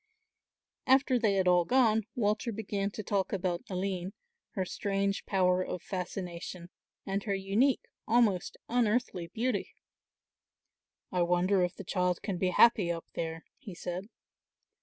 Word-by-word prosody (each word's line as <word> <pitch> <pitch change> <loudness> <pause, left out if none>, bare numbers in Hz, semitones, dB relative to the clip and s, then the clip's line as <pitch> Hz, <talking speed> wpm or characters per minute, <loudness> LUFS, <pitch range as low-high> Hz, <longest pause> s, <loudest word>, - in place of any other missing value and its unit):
After 265 -1 +4
they 210 -3 +2
had 190 -1 +2
all 180 -1 +5
gone 225 0 +3
Walter 215 +1 0
began 200 -2 -2
to 215 +1 -7
talk 195 0 0
about 180 -2 -1
Aline, 185 0 -2 0.4
her 190 -3 0
strange 195 +1 -1
power 185 -1 +3
of 180 - -5
fascination 180 -1 -5 0.3
and 195 0 -1
her 200 -2 0
unique, 205 +8 +1 0.2
almost 220 -6 +2
unearthly 230 -6 0
beauty. 225 +3 -2 1.4
"I 180 - +1
wonder 180 +2 +3
if 180 0 -1
the 200 - -8
child 180 -1 0
can 190 -4 -3
be 185 - +2
happy 195 -2 +5
up 165 -1 -4
there," 165 0 -4
he 215 -10 -9
said. 180 +4 -5
195 Hz, 140 wpm, -31 LUFS, 180-215 Hz, 1.4 s, all